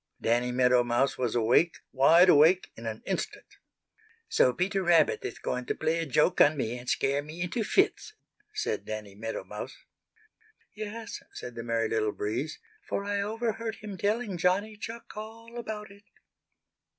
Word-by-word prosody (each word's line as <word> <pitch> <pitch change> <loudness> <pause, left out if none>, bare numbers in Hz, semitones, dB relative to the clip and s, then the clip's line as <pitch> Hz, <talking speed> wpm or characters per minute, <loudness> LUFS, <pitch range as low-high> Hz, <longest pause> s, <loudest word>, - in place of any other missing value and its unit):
Danny 120 +2 +1
Meadow 125 0 +4
Mouse 120 +3 +1
was 125 -3 -1
awake, 120 +9 +3
wide 165 +7 +6
awake 170 +3 +5
in 115 0 -7
an 110 0 -5
instant. 190 - -3 0.8
"So 130 - +4
Peter 190 +7 0
Rabbit 170 -4 +3
is - - -5
going 125 0 -3
to - - -1
play 160 +1 0
a 165 - -2
joke 150 +6 +3
on 150 +1 +6
me 120 -3 -2
and 125 0 -7
scare 140 +1 +1
me 155 +3 -10
into 200 +6 -2
fits!" 390 - +1 0.4
said 425 0 -2
Danny 105 -2 -6
Meadow 110 +3 -5
Mouse. - - -7 1.0
"Yes," 215 +1 -6
said 125 - -7
the 115 - -6
Merry 115 -1 0
Little 110 -1 0
Breeze, 120 +9 -3 0.2
"for 200 - -3
I 200 0 0
overheard 225 +1 -2
him 210 -2 -8
telling 205 -1 -1
Johnny 195 +5 +1
Chuck 225 +3 -8
all 225 +2 -9
about 210 -3 -6
it." 200 +1 -17
165 Hz, 165 wpm, -29 LUFS, -, 1.0 s, wide